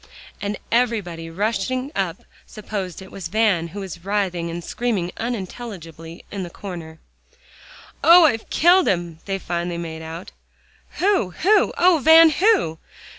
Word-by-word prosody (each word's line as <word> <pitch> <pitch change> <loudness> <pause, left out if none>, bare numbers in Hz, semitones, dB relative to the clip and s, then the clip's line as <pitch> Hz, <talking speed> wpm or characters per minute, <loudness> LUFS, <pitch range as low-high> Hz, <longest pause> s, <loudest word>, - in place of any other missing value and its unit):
And 205 +1 -3
everybody 205 -9 0
rushing 220 - -2
up - - -2 0.2
supposed 195 -4 -6
it 190 - -14
was 190 -3 -6
Van, 195 -4 +1
who 200 +5 -8
was 180 -3 -8
writhing 190 -4 -1
and 170 +1 -6
screaming 205 -5 -2
unintelligibly 185 -7 -7
in 200 - -4
the 175 - -5
corner. 170 -4 -8 1.1
"Oh! 340 0 +8
I've 225 -7 0
killed 355 +3 +4
him," 170 -3 -1
they 195 -1 -2
finally 175 -1 -3
made 160 -1 -6
out. 160 +3 -8 0.7
"Who 380 - +2
who? 420 +4 +4
Oh, 350 -2 +4
Van! 320 +1 +8
who?" 365 - +2
195 Hz, 135 wpm, -22 LUFS, 170-240 Hz, 1.1 s, Oh